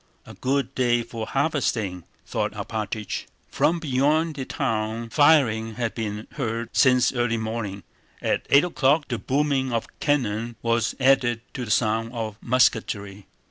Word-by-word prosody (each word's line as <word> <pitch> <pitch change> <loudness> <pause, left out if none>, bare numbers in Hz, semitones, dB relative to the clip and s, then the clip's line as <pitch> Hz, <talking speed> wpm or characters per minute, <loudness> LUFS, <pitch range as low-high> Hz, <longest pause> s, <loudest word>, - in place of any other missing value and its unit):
"A - - -11
good 135 0 -1
day 120 -2 +2
for 115 -1 -6
harvesting," 115 - -1 0.2
thought - - -2
Alpátych. 110 -1 -4 0.3
From 170 +2 +2
beyond 155 +2 +1
the 135 -2 -4
town 110 +1 -2
firing 120 -8 +4
had 115 -2 -2
been 105 -2 -4
heard 115 -3 -3
since 125 -1 +4
early 120 -2 0
morning. 110 -3 -4 0.4
At - - -1
eight 140 +1 +6
o'clock 150 -3 +2
the 120 -3 -2
booming 135 -1 0
of 115 -1 -1
cannon 120 -5 0
was 115 0 +1
added 130 -3 +3
to 125 - -4
the - - -9
sound 115 +1 +1
of 110 -3 -4
musketry. 105 -5 +1
120 Hz, 140 wpm, -24 LUFS, 110-135 Hz, 0.4 s, eight